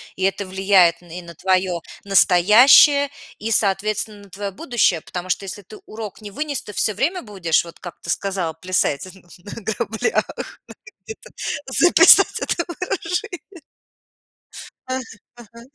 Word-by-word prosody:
И 190 Hz, -, -5 dB
это 195 Hz, +1 st, 0 dB
влияет 190 Hz, -2 st, +3 dB
н 175 Hz, -, -17 dB
и 180 Hz, +2 st, -7 dB
на 170 Hz, -1 st, -13 dB
твое 185 Hz, 0 st, 0 dB, 0.2 s
настоящее 215 Hz, -, +5 dB, 0.3 s
и, 220 Hz, +2 st, -5 dB
соответственно, 205 Hz, 0 st, 0 dB
на 200 Hz, -, -17 dB
твое 200 Hz, +2 st, -5 dB
будущее, 200 Hz, -, 0 dB
потому 180 Hz, +2 st, -7 dB
что 195 Hz, -, -2 dB
если 195 Hz, +2 st, -7 dB
ты 210 Hz, +3 st, -14 dB
урок 215 Hz, -2 st, -8 dB
не 205 Hz, -1 st, -9 dB
вынес, 290 Hz, +4 st, -4 dB
ты 210 Hz, -, -10 dB
всё 210 Hz, +2 st, -1 dB
время 335 Hz, -, -1 dB
будешь, 185 Hz, -7 st, -1 dB
вот 170 Hz, -1 st, -13 dB
как 175 Hz, -2 st, -10 dB
ты -, -, -10 dB
сказал, 185 Hz, -3 st, -2 dB
плясать 180 Hz, -5 st, -1 dB
на 190 Hz, +3 st, -12 dB
граблях. 220 Hz, -, -1 dB
Надо -, -, -6 dB, 0.6 s
где-то 445 Hz, +3 st, -11 dB, 0.4 s
записать 340 Hz, +6 st, +5 dB
это 340 Hz, -, -2 dB
выражение. 360 Hz, 0 st, -5 dB, 1.3 s
Ах, 260 Hz, -3 st, -6 dB, 0.3 s
ага. 235 Hz, 0 st, -15 dB
200 Hz, 145 wpm, -20 LUFS, 185-240 Hz, 1.3 s, настоящее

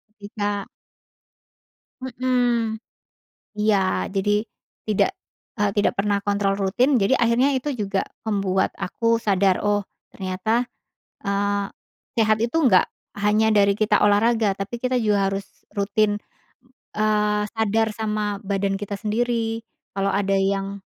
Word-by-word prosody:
ketika 205 Hz, -1 st, -3 dB, 1.4 s
Mhm. 245 Hz, -3 st, 0 dB, 0.8 s
Iya, 195 Hz, -, +2 dB
jadi 195 Hz, +2 st, +1 dB, 0.6 s
tidak, 215 Hz, -, +2 dB, 0.5 s
eee, 205 Hz, -1 st, +2 dB
tidak 205 Hz, -, +2 dB
pernah 205 Hz, 0 st, +2 dB
kontrol 200 Hz, -1 st, +1 dB
rutin, 220 Hz, +8 st, +2 dB
jadi 260 Hz, +7 st, +3 dB
akhirnya 240 Hz, +4 st, +3 dB
itu 290 Hz, +3 st, -3 dB
juga 195 Hz, -3 st, -2 dB, 0.2 s
membuat 195 Hz, -3 st, 0 dB
aku 230 Hz, +4 st, 0 dB
sadar, 195 Hz, -3 st, +2 dB
"Oh, 205 Hz, -1 st, +1 dB, 0.3 s
ternyata, 195 Hz, +6 st, -1 dB, 0.6 s
eee, 200 Hz, 0 st, 0 dB, 0.5 s
sehat 215 Hz, -1 st, +3 dB
itu 235 Hz, +7 st, 0 dB
nggak 190 Hz, -8 st, +5 dB, 0.3 s
hanya 210 Hz, +2 st, +3 dB
dari 200 Hz, -1 st, +4 dB
kita 210 Hz, -1 st, +3 dB
olahraga. 210 Hz, 0 st, +3 dB
Tapi 200 Hz, +5 st, -5 dB
kita 255 Hz, +1 st, -1 dB
juga 205 Hz, -4 st, +2 dB
harus 195 Hz, 0 st, -3 dB, 0.3 s
rutin, 205 Hz, +1 st, +1 dB, 0.8 s
eee, 210 Hz, -1 st, +1 dB
sadar 220 Hz, 0 st, +1 dB
sama 210 Hz, -2 st, -1 dB
badan 195 Hz, 0 st, 0 dB
kita 205 Hz, 0 st, -5 dB
sendiri, 225 Hz, 0 st, -1 dB, 0.3 s
kalau 195 Hz, 0 st, +1 dB
ada 195 Hz, 0 st, +1 dB
yang 195 Hz, 0 st, -1 dB
210 Hz, 115 wpm, -23 LUFS, 200-225 Hz, 1.4 s, nggak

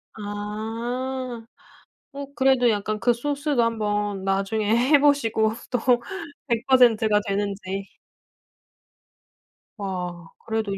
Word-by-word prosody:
아. 225 Hz, +4 st, -4 dB, 0.7 s
어 280 Hz, 0 st, -6 dB
그래도 260 Hz, -2 st, +4 dB
약간 215 Hz, 0 st, -1 dB
그 240 Hz, +3 st, +3 dB
소스도 285 Hz, +1 st, 0 dB
한번 210 Hz, -3 st, -1 dB
나중에 200 Hz, +3 st, +1 dB
해보시고 265 Hz, -5 st, +3 dB, 0.2 s
또 245 Hz, -, +1 dB, 0.7 s
100 235 Hz, +1 st, 0 dB
퍼센트가 225 Hz, -5 st, +5 dB
되는지. 195 Hz, -1 st, -3 dB, 1.8 s
와 180 Hz, -4 st, -5 dB, 0.2 s
그래도 220 Hz, -3 st, -2 dB
220 Hz, 180 characters per minute, -24 LUFS, 205-250 Hz, 1.8 s, 퍼센트가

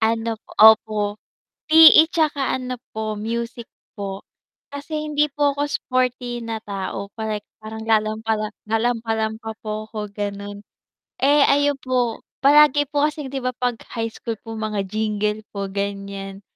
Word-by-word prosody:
Ano 225 Hz, 0 st, 0 dB
po -, -, -19 dB
opo. 220 Hz, -1 st, +6 dB, 0.7 s
PE 315 Hz, 0 st, +9 dB
'tsaka 300 Hz, -4 st, +1 dB
ano 255 Hz, 0 st, -4 dB, 0.2 s
po, 215 Hz, -1 st, -3 dB
music 235 Hz, +2 st, -4 dB, 0.3 s
po. 195 Hz, -1 st, -6 dB, 0.5 s
Kasi 305 Hz, +2 st, -4 dB
hindi 300 Hz, 0 st, +1 dB
po 285 Hz, 0 st, +1 dB
ako 285 Hz, -, -1 dB
sporty 250 Hz, -2 st, -1 dB
na 225 Hz, -1 st, -3 dB
tao 195 Hz, 0 st, -4 dB
parek 215 Hz, -2 st, -4 dB, 0.2 s
parang 220 Hz, +1 st, -7 dB
lalampa-lam 215 Hz, 0 st, 0 dB, 0.2 s
lalampa-lampa 225 Hz, -1 st, -1 dB
po 215 Hz, 0 st, -4 dB
ko 210 Hz, -1 st, -6 dB
ganun. 205 Hz, 0 st, -6 dB, 0.6 s
Eh 285 Hz, +1 st, +5 dB
ayun 285 Hz, 0 st, +3 dB
po, 250 Hz, -3 st, -1 dB, 0.2 s
palagi 290 Hz, 0 st, +6 dB
po 290 Hz, 0 st, +2 dB
kasing 300 Hz, -2 st, -3 dB
'di 270 Hz, -, -1 dB
ba 255 Hz, -, 0 dB
pag 245 Hz, -2 st, -1 dB, 0.2 s
high 225 Hz, -1 st, -1 dB
school 230 Hz, 0 st, -5 dB
po 225 Hz, -1 st, -8 dB
mga 215 Hz, -2 st, -2 dB
jingle 210 Hz, 0 st, -1 dB
po 200 Hz, -1 st, -4 dB
ganyan. 200 Hz, 0 st, -5 dB
225 Hz, 140 wpm, -22 LUFS, 215-260 Hz, 0.7 s, PE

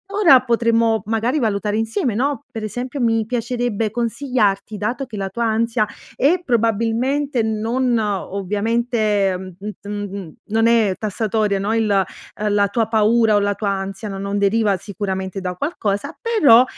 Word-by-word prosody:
ora 340 Hz, -11 st, +7 dB
potremmo 230 Hz, -2 st, +2 dB
magari 225 Hz, +6 st, 0 dB
valutare 210 Hz, -3 st, 0 dB
insieme, 225 Hz, +2 st, -1 dB
no, 280 Hz, +5 st, -1 dB
per 225 Hz, -2 st, -6 dB
esempio 245 Hz, +6 st, -4 dB
mi 225 Hz, -2 st, +2 dB
piacerebbe 235 Hz, -2 st, -1 dB
consigliarti, 230 Hz, -3 st, -1 dB
dato 235 Hz, +7 st, -2 dB
che 215 Hz, -4 st, -8 dB
la 195 Hz, -1 st, -3 dB
tua 235 Hz, +5 st, -2 dB
ansia 225 Hz, 0 st, +1 dB, 0.3 s
è 315 Hz, +8 st, +3 dB
probabilmente 235 Hz, +4 st, +1 dB
non 230 Hz, +3 st, 0 dB
ovviamente, 210 Hz, +1 st, 0 dB, 0.2 s
mh 205 Hz, +2 st, -5 dB
t 200 Hz, -, -12 dB
mh, 200 Hz, -5 st, -5 dB, 0.2 s
non 225 Hz, +1 st, +3 dB
è 225 Hz, -5 st, +3 dB
tassatoria, 215 Hz, -1 st, 0 dB
no, 205 Hz, +3 st, -1 dB
il 225 Hz, -1 st, +1 dB
ehm, 200 Hz, +1 st, -1 dB
la 205 Hz, 0 st, +3 dB
tua 220 Hz, +2 st, 0 dB
paura 225 Hz, 0 st, +3 dB
o -, -, +5 dB
la 205 Hz, 0 st, 0 dB
tua 205 Hz, -, -2 dB
ansia 195 Hz, +1 st, -4 dB
no 195 Hz, -1 st, -5 dB
non 200 Hz, +1 st, -2 dB
deriva 200 Hz, 0 st, +2 dB
sicuramente 190 Hz, 0 st, -4 dB
da 180 Hz, -1 st, -3 dB
qualcosa, 205 Hz, -, -2 dB
però 310 Hz, -, +6 dB
220 Hz, 155 wpm, -20 LUFS, 200-235 Hz, 0.3 s, ora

